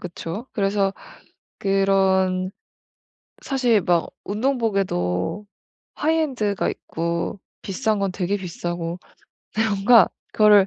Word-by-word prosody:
그쵸? 180 +6 -6
그래서 195 -2 +1 0.7
그런 190 -1 +2 0.9
사실 250 -6 +2
막 170 -2 +2 0.2
운동복에도 200 - -1 0.5
하이엔드가 275 -11 0
있고 170 +4 -3 0.2
비싼 215 +1 -1
건 195 -1 0
되게 185 +2 -1
비싸고 175 -2 -4 0.6
근데 220 +1 +2
뭔가 200 +1 +6 0.2
그거를 210 -2 +6
195 Hz, 210 characters per minute, -23 LUFS, 180-215 Hz, 0.9 s, 뭔가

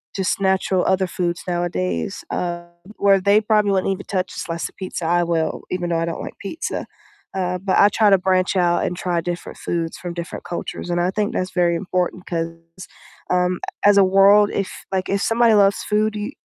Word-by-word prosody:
just 195 0 -1
natural 190 -1 +1
other 190 0 +2
foods 175 -1 -2
nowadays, 90 - -2
um, 175 -1 -3 0.3
where 195 -1 +4
they 200 +2 +5
probably 210 -2 +2
wouldn't 195 0 +1
even 195 - -8
touch 185 -1 -2
a - - -6
slice 165 0 -3
of - - -17
pizza, 185 -3 -5
I 175 +1 +2
will, 165 -2 -1
even 175 -1 -2
though 165 - +1
I - - 0
don't 170 - -4
like - - -8
pizza, 260 +12 -4 0.5
uh, 180 -1 -1
but 190 +1 0
I 205 - +7
try 210 0 +3
to 195 - +7
branch 185 0 +1
out 175 -1 +2
and 180 - -2
try 175 -1 -1
different 175 0 -5
foods 165 -1 -3
from 175 -1 -6
different 170 0 -6
cultures, 175 0 -5
and 175 - 0
I 180 - +1
think 210 0 -1
that's 185 0 -1
very 175 -1 +2
important 180 0 -2
'cause, 165 -1 -2 0.8
um, 180 0 +1 0.3
as 205 -1 +6
a 200 - +7
world 195 +2 +5
if, 195 - -1 0.2
like, 185 -1 -1
if 200 0 0
somebody 230 0 +3
loves 200 -1 +4
food, 215 +1 0
y 210 +5 -4
185 Hz, 205 wpm, -21 LUFS, 175-200 Hz, 0.8 s, I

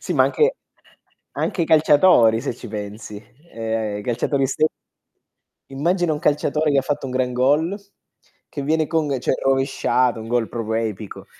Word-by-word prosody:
Sì - - -4
ma - - +4
anche - - -1
anche 475 +2 +4 0.8
anche 175 - -1
i - - +2
calciatori 150 -7 +5
se 120 - -3
ci - - -11
pensi. 105 0 -7 0.3
Ehm, 110 -2 -3
i - - -7
calciatori 125 +4 0
ste 140 +4 +1 1.0
immagina 170 +5 0
un 150 - -3
calciatore 150 -1 +1
che 140 -1 +3
fatto 145 +1 -3
un 130 - -6
gran 130 -1 0
goal, 145 +9 +1 0.7
che 140 - -6
viene 155 +2 +1
con 160 -1 0
cioè 130 - 0
rovesciata, 135 -3 +1
un 110 - -8
goal 120 -2 0
proprio 110 -1 -4
epico, 105 -1 -7
135 Hz, 165 wpm, -21 LUFS, 115-150 Hz, 1.0 s, calciatori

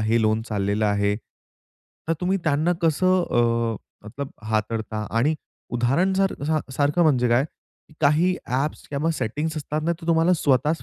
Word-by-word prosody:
हे 110 +2 +2
लोन 110 +1 +2
चाललेलं 105 0 0
आहे, 100 0 +1 0.9
तर 165 - +3
तुम्ही 185 +2 +1
त्यांना 160 +2 +2
कसं 185 +3 +3
अ, 115 -1 +1 0.3
मतलब 140 +5 -6 0.2
हाताळता? 110 0 -2
आणि 125 +8 +2 0.4
उदाहरण 135 +11 +1
सार 195 0 +2 0.4
सारखं 145 +5 +2
म्हणजे 130 -7 +3
काय, 120 +3 +3 0.6
काही 160 +5 +3
ॲप्स 135 +4 -2
किंवा 150 +3 0
सेटिंग्स 150 +5 -3
असतात 155 +1 -3
ना 170 - +2
तर 165 - -9
तुम्हाला 165 +1 +3
स्वतःच 150 +1 +1
140 Hz, 145 wpm, -24 LUFS, 115-160 Hz, 0.9 s, तर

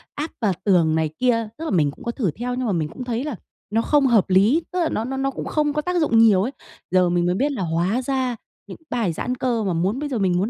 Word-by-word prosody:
áp 300 +2 -4
vào 210 -4 +2
tường 170 -6 +3
này 160 -1 +1
kia. 230 -3 +2
Tức 325 - -6
là - - -2
mình 150 -6 +2
cũng - - -15
có 235 - -1
thử 220 - -1
theo, 245 +7 -4
nhưng 255 0 -2
mà 220 - 0
mình 160 -3 -1
cũng 255 - -7
thấy 245 0 -2
là 295 -4 -4 0.3
nó 225 +2 +1
không 290 +3 +2
hợp 225 -6 +3
lý, 205 - +4
tức 365 - -2
là 335 - +1
nó 220 - -2
nó 265 +2 -4
nó 270 0 0
cũng - - -6
không 300 -1 0
có 300 - 0
tác 360 +2 -1
dụng 260 -7 +2
nhiều 215 -5 +6
ấy. 245 - -2 0.4
Giờ 180 -1 +4
mình 175 0 +1
mới 180 +1 +1
biết 285 +9 +1
là 260 - -4
hóa 175 +8 0
ra 260 -2 -1 0.3
những - - -9
cái 320 - -31
bài 225 -9 0
giãn 250 +10 -3
cơ 240 -3 -1
mà 190 -3 0
muốn 190 +10 0
bây 295 - -3
giờ 255 - -2
mình 185 -3 +2
muốn 200 +5 0
230 Hz, 295 wpm, -22 LUFS, 185-265 Hz, 0.4 s, nhiều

